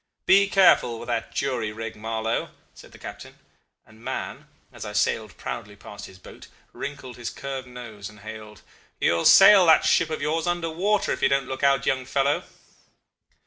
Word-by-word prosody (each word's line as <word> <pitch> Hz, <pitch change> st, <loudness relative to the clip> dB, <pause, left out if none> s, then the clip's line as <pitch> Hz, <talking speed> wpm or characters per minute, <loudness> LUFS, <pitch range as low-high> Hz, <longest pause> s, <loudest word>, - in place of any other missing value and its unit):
'Be 200 Hz, +1 st, +5 dB
careful 175 Hz, -10 st, +4 dB
with 120 Hz, -, -8 dB
that 115 Hz, -1 st, -2 dB
jury 125 Hz, -6 st, -2 dB
rig, 115 Hz, +1 st, -7 dB
Marlow,' 110 Hz, +1 st, -3 dB, 0.2 s
said -, -, -15 dB
the -, -, -15 dB
captain; -, -, -10 dB, 0.5 s
and 110 Hz, +1 st, -19 dB
Mahon, -, -, -5 dB, 0.3 s
as -, -, -9 dB
I -, -, -7 dB
sailed -, -, -1 dB
proudly 105 Hz, 0 st, -7 dB
past 100 Hz, 0 st, -11 dB
his 95 Hz, -, -15 dB
boat, 95 Hz, -, -14 dB, 0.3 s
wrinkled 140 Hz, -3 st, -7 dB
his 120 Hz, -2 st, -5 dB
curved 135 Hz, -2 st, -6 dB
nose 115 Hz, -5 st, -9 dB
and 105 Hz, -1 st, -16 dB
hailed, 110 Hz, -1 st, -10 dB, 0.4 s
'You -, -, +2 dB
will 85 Hz, -, -1 dB
sail 195 Hz, -2 st, +8 dB
that 160 Hz, -1 st, +5 dB
ship 155 Hz, +1 st, +3 dB
of 155 Hz, -, -3 dB
yours 160 Hz, +3 st, -1 dB
under 175 Hz, -2 st, -1 dB
water, 200 Hz, +5 st, 0 dB
if -, -, -3 dB
you -, -, +3 dB
don't 135 Hz, 0 st, 0 dB
look 130 Hz, 0 st, -6 dB
out, 140 Hz, -1 st, +2 dB
young 130 Hz, -1 st, 0 dB
fellow. 140 Hz, +2 st, 0 dB
130 Hz, 185 wpm, -24 LUFS, 110-155 Hz, 0.5 s, sail